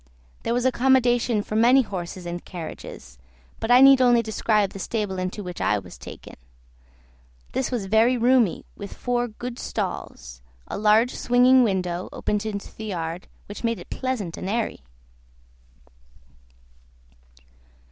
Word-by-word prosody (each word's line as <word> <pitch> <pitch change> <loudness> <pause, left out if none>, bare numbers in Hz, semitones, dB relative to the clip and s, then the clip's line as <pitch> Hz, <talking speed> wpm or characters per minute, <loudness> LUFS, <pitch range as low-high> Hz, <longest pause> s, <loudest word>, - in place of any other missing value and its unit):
There 235 - -1
was 245 +1 0
accommodation 245 -3 +3
for 215 - -5
many 245 +4 +5
horses 180 -3 -6
and 175 0 -5
carriages; 160 - -9 0.4
but 225 - -4
I 245 +1 +7
need 270 -1 +8
only 240 -2 +5
describe 215 -2 +1
the 195 - -9
stable 205 -2 -3
into 185 +3 -4
which 180 -1 -7
I 105 - +2
was 90 -7 -9
taken; - - -11 1.1
this 260 - -1
was 240 -6 -2
very 220 +5 +3
roomy, 240 -4 +2
with 200 -1 -8
four 245 -1 -1
good 240 +2 -7
stalls; - - -5 0.3
a - - -5
large 215 +4 +3
swinging 250 +1 +4
window 185 -5 -1
opened 210 +1 -2
into 200 -2 -6
the 220 - -7
yard, 170 -3 -4 0.2
which 205 - -9
made 230 -1 0
it - - -12
pleasant 245 -10 -3
and 190 - -5
airy. 225 +1 -2
220 Hz, 140 wpm, -24 LUFS, 190-245 Hz, 1.1 s, need